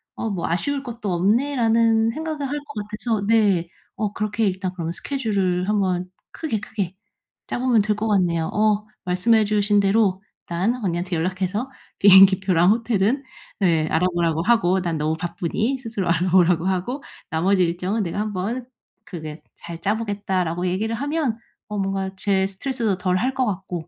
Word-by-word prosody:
'어 225 - -3
뭐 185 -5 -2
아쉬울 275 - -1
것도 230 -6 -5
없네.'라는 225 +2 +2
생각을 305 +1 -3
할 290 +2 -3
것 210 -8 -6
같아서 215 -1 -2
네 205 -6 +3 0.3
어 210 -2 -2
그렇게 215 +1 -1
일단 185 -1 -1
그러면 170 -2 -4
스케줄을 195 -10 -1
한번 185 -3 0 0.2
크게 295 -10 -3
크게 200 -7 -4 0.5
짜보면 245 -3 +2
될 210 0 0
것 220 +1 -1
같네요. 175 -5 +1
어 210 0 +2 0.2
말씀해 215 +5 +3
주신 205 0 +2
대로 195 -1 +2 0.3
일단 185 +8 0
언니한테 175 0 -1
연락해서 190 +8 -2 0.3
비행기 195 -1 +8
표랑 185 -1 +3
호텔은 230 +3 +1 0.4
네 165 -5 +2
알아보라고 170 -1 +1
하고 190 -4 +3
"난 170 -3 -2
너무 155 +1 0
바쁘니 180 +9 -2
스스로 220 -8 -3
알아보라."고 175 0 +3
하고 190 +9 -2 0.3
"나머지 185 +4 +2
일정은 180 +5 -1
내가 180 +3 -3
한번 215 +4 -3 0.4
크게 155 -3 -8
잘 170 -1 -9
짜 205 +4 +1
보겠다."라고 190 -5 -2
얘기를 215 +5 -1
하면 285 -3 -1 0.3
어 210 - -4
뭔가 195 -1 -1
제 190 -1 +1
스트레스도 220 -1 -2
덜 180 0 0
할 255 +6 0
것 260 -1 +1
같고 180 -3 -5
195 Hz, 340 characters per minute, -22 LUFS, 180-225 Hz, 0.5 s, 비행기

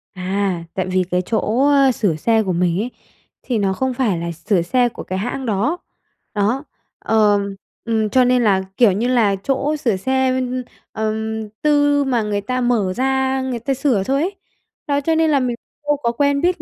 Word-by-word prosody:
À, 185 -1 -1
tại 185 -1 -1
vì 185 0 +1
cái 180 0 +2
chỗ, 225 +6 0
ơ, 275 -2 +5
sửa 200 -9 0
xe 220 +7 +2
của 185 -2 -1
mình 175 +1 +1
ấy, 245 +3 -2 0.5
thì 240 -3 -1
nó 195 -2 +1
không 260 +5 -1
phải 230 -9 0
là 170 0 -3
sửa 175 +3 0
xe 245 +7 +2
của - - -9
cái 185 0 -4
hãng 250 +5 -3
đó. 230 - 0 0.6
Đó, 220 +7 0 0.4
ờ, 210 -2 +3 0.5
ừm, 220 -2 0
cho 255 +2 +4
nên 250 -1 +3
là, 195 -3 +3 0.2
kiểu 230 -5 +6
như 220 +6 0
là, 225 -6 +3
chỗ 280 +2 0
sửa 230 -8 0
xe, 260 +5 +1 0.5
ừm, 220 0 -3
tư 290 -1 +3
mà 250 -4 +1
người 205 -1 -1
ta 255 +4 -2
mở 220 -7 +1
ra 265 0 +1
người 255 -3 -3
ta 270 +4 -1
sửa 255 -7 +1
thôi 275 +7 0
ấy. 385 +4 -2 0.5
Đó 285 0 +1
cho 320 +3 +1
nên 320 0 +3
là 280 - +4
mình 245 -2 -1 0.3
đâu 295 - +2
có 235 - +2
quen 280 +3 +1
biết 355 +1 +1
235 Hz, 200 wpm, -19 LUFS, 200-265 Hz, 0.6 s, kiểu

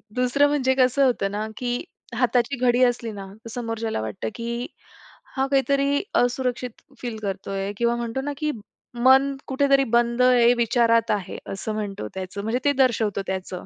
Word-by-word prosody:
दुसरं 250 +3 +3
म्हणजे 265 -3 +1
कसं 260 +1 +3
होतं 200 -6 +1
ना, 210 +1 -3
की 245 -1 -2 0.3
हाताची 245 +2 +1
घडी 250 0 +3
असली 240 -2 +1
ना, 200 -2 -7 0.2
तर 230 - -7
समोरच्याला 225 - -3 0.3
की, 235 +2 -4 0.7
हा 270 - +2
काहीतरी 280 +2 +2
असुरक्षित 245 -1 0 0.2
फील 240 -3 -4
करतोय 195 0 -3
किंवा 235 +1 +1
म्हणतो 235 +2 -3
ना, 290 +1 -3
की 305 -1 -1 0.5
मन 270 +2 +5
कुठेतरी 275 0 +3
बंद 235 +1 +3
आहे, 245 -1 +5
विचारात 230 -1 +3
आहे 200 -4 -2 0.2
असं 215 +2 -4
म्हणतो 205 - -4
त्याचं, 190 +1 -5
म्हणजे 225 +3 0
ते 285 - +5
दर्शवतो 220 -5 0
त्याचं 185 -1 -4
240 Hz, 155 wpm, -24 LUFS, 220-260 Hz, 0.7 s, मन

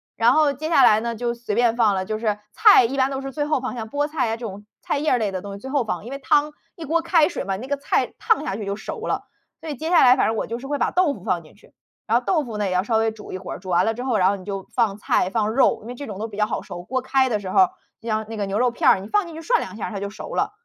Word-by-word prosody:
然 230 +1 +4
后 300 -1 +3
接 310 +4 -5
下 275 -5 +5
来 215 +1 +5
呢， 235 -1 -3
就 235 0 -1
随 235 -3 -5
便 235 0 +2
放 215 -5 +3
了。 190 0 -2
就 215 +1 -3
是 210 -2 -1
菜 410 - +7
一 265 +4 -2
般 265 0 +2
都 270 - -3
是 270 0 -6
最 295 - -1
后 300 -2 0
放， 255 0 -4
像 220 -2 -6
菠 290 +3 0
菜 300 -6 -1
呀 225 - -2
这 235 - -7
种 205 0 -8 0.2
菜 - - -1
叶 310 - +1
儿 250 - +4
类 215 -3 0
的 185 - -3
东 200 0 -8
西 200 - -8
最 265 - -8
后 275 -3 +1
放。 210 -2 -4
因 250 - -8
为 275 - -4
汤， 295 +2 +2 0.2
一 325 - -7
锅 330 +3 +1
开 330 -2 +4
水 350 - -4
嘛， 195 -1 -2
那 255 +5 -8
个 285 - 0
菜 280 - -1
烫 445 -10 +2
下 195 - -2
去 210 -1 -5
就 200 +1 -3
熟 - - -6
了。 - - -2 0.3
所 320 - -8
以 290 - -3
接 320 +5 -4
下 350 - +5
来 250 0 +7
反 - - +2
正 220 0 -1
我 - - -2
就 230 +2 -4
是 270 - -8
会 290 0 -1
把 - - 0
豆 360 -6 +2
腐 190 - -12
放 175 -3 0
进 155 - -19
去。 - - -22 0.3
然 230 +2 +4
后 250 - -2
豆 315 -7 +1
腐 220 -3 -6
呢， 205 -2 0
也 - - -2
要 180 +1 +1
稍 225 +1 -1
微 225 0 +1
煮 215 -3 -11
一 - - -3
会 - - -8
儿。 - - -6
煮 190 - -14
完 175 +1 +3
了 225 - +1
之 245 +3 -6
后， 240 -5 +1
然 185 0 +4
后 200 - 0
你 185 - -13
就 195 -2 -5
放 220 -5 +1
菜、 185 -3 +1
放 215 0 0
肉， 265 - +3
因 220 - -12
为 - - -5
这 285 0 -7
种 205 -2 -7
都 220 +1 -4
比 205 - -10
较 210 - +3
好 215 - -3
熟。 175 0 -8
锅 260 +5 -2
开 260 0 +2
的 210 -3 0
时 190 -2 -6
候， 370 - +5 0.3
就 230 - -6
像 215 0 -1
那 225 - -6
个 205 -2 -2
牛 195 +3 -2
肉 250 0 +3
片 - - +3
儿， - - +5
你 195 - -8
放 410 - +1
进 335 - -10
去 325 - -8
涮 480 +7 +2
两 - - -7
下 - - -4
它 200 -3 -5
就 200 - -3
熟 215 - -8
了。 - - 0
235 Hz, 380 characters per minute, -22 LUFS, 210-280 Hz, 0.3 s, 菜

